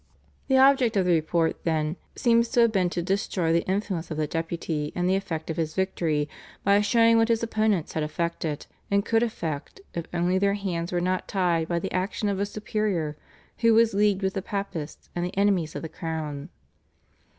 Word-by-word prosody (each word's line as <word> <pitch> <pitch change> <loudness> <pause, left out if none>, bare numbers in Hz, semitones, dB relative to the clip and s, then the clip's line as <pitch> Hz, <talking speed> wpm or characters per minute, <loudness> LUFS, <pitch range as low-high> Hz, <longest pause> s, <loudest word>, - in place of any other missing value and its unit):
The 265 - +4
object 260 -5 +5
of 190 - +3
the 180 - +3
report, 165 +1 0
then, 155 -1 0 0.2
seems 235 -1 +3
to 240 - +3
have 230 -1 +5
been 185 -4 +2
to 175 0 -2
destroy 185 -3 0
the 170 - +2
influence 190 -3 -2
of 155 - -4
the 155 - +1
Deputy 165 -1 -3
and 180 0 0
the 190 - +3
effect 165 -5 -3
of 160 - -5
his 160 -2 -2
victory, 165 -6 0 0.4
by 200 +1 +4
showing 230 +2 +4
what 225 - +4
his 230 -1 +1
opponents 215 -6 0
had 160 - -1
effected 155 -1 -2 0.2
and 200 +1 +2
could 225 0 +2
effect 165 - -3
if 170 -1 -4
only 175 +2 +1
their 200 0 +2
hands 180 -4 -3
were 175 -1 0
not 185 +1 -1
tied 175 -4 +1
by 170 - 0
the 190 +3 -3
action 195 +3 -1
of 195 -1 -1
a 200 - 0
superior 205 -7 -2 0.4
who 230 -2 +5
was 230 -1 +4
leagued 200 -1 +2
with 190 0 0
the 195 - -2
Papists 195 -6 -5
and 175 - -1
the 180 +2 -4
enemies 195 -6 +2
of - - -5
the - - -3
crown. 155 -2 -5
185 Hz, 200 wpm, -26 LUFS, 165-205 Hz, 0.4 s, object